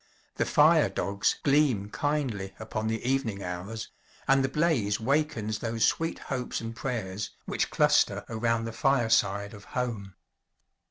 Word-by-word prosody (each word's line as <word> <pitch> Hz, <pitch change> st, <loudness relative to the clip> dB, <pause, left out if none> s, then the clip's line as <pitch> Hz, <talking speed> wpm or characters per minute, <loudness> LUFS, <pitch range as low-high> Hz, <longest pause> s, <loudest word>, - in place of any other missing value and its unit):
The -, -, +1 dB
fire -, -, +5 dB
dogs 100 Hz, 0 st, 0 dB
gleam 135 Hz, -8 st, +2 dB
kindly 125 Hz, -10 st, -2 dB
upon 110 Hz, 0 st, -4 dB
the 110 Hz, +1 st, -2 dB
evening 120 Hz, -7 st, 0 dB
hours; 90 Hz, +5 st, -5 dB, 0.4 s
and 135 Hz, 0 st, +4 dB
the 135 Hz, -, +1 dB
blaze 135 Hz, -9 st, +1 dB
wakens 125 Hz, -4 st, 0 dB
those 115 Hz, -1 st, 0 dB
sweet 165 Hz, 0 st, 0 dB
hopes 130 Hz, -2 st, -4 dB
and 115 Hz, 0 st, -6 dB
prayers 105 Hz, -6 st, -3 dB, 0.2 s
which -, -, -1 dB
cluster -, -, +3 dB
around 115 Hz, 0 st, 0 dB
the 115 Hz, -, -5 dB
fireside 110 Hz, -5 st, +2 dB
of 105 Hz, -1 st, -11 dB
home. 110 Hz, -7 st, -3 dB
115 Hz, 140 wpm, -28 LUFS, 100-135 Hz, 0.4 s, fire